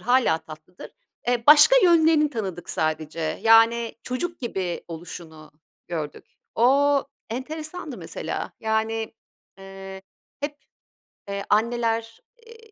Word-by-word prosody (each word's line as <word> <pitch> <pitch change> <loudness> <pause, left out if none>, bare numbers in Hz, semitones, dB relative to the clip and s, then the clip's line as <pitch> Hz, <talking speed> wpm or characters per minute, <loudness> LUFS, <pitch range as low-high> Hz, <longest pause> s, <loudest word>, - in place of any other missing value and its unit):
hâlâ 245 -10 +3
tatlıdır. 155 +4 -12 0.4
Eee, 240 -1 +1
başka 300 +11 +8
yönlerini 320 -3 +4
tanıdık 195 - -5
sadece. 155 0 -2 0.2
Yani 225 +1 +5
çocuk 340 +8 -4
gibi 190 -8 -4
oluşunu 160 -2 -10 0.4
gördük. 155 -4 -5 0.3
O 280 +4 +4 0.3
enteresandı 310 +3 -6
mesela. - - -5
Yani, 220 0 -1 0.4
eee, 195 0 -10 0.4
hep, 290 +1 -4 0.7
eee, 200 0 -3
anneler, 230 +1 0 0.3
eee, 455 -1 -16
225 Hz, 100 wpm, -24 LUFS, 185-285 Hz, 0.7 s, başka